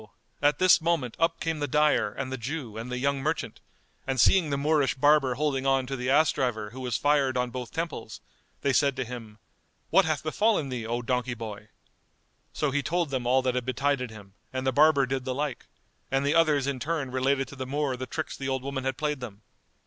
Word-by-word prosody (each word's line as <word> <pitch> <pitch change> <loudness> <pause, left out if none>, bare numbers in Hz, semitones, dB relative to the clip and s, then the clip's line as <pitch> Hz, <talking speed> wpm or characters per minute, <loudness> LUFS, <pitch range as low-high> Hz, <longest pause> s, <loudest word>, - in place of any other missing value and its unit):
at 145 0 +3
this 185 -2 +5
moment 160 -8 0
up 165 0 +1
came 165 -2 -2
the 145 - -1
dyer 150 -6 +2
and 130 +2 -5
the 130 - -3
Jew 125 -2 -5
and 115 +3 -6
the 125 - -2
young 140 +2 0
merchant, 155 +4 -2 0.5
and 135 -1 -1
seeing 180 +1 +5
the 140 - 0
Moorish 145 -3 +2
barber 135 -2 +4
holding 135 -1 0
on 135 -1 +2
to 135 +2 -4
the 125 0 -3
ass 150 +3 +5
driver 110 -5 -2
who 130 - -9
was 125 -4 -1
fired 140 -3 +2
on 125 -1 -1
both 125 -1 -6
temples, 165 -10 -5 0.4
they 140 - +1
said 140 0 +3
to 130 -1 -2
him, 115 -3 -8 0.5
"What 195 - +5
hath 155 -2 -1
befallen 160 -1 +1
thee, 120 -3 -4
O 120 +1 -2
donkey 125 0 -1
boy?" 105 -2 -7 0.8
So 150 -2 -1
he 145 +2 +1
told 160 +1 -1
them 130 -3 -2
all 130 +1 +3
that 130 -1 +1
had 125 0 -1
betided 130 -1 0
him 100 -3 -13 0.2
and 130 0 -3
the 130 - +3
barber 145 0 +5
did 130 0 -2
the 130 0 -3
like; 145 -3 -3 0.4
and 135 +1 +1
the 145 - +2
others 155 -4 +3
in 140 -2 -2
turn 145 -1 -2
related 135 +1 +1
to 140 - -10
the 130 -1 -5
Moor 140 -1 -1
the 130 +1 -6
tricks 160 +3 -4
the 135 0 -4
old 130 -1 -2
woman 135 -1 -3
had 135 -1 -1
played 150 -2 -1
them. 110 -5 -9
135 Hz, 225 wpm, -27 LUFS, 125-150 Hz, 0.8 s, this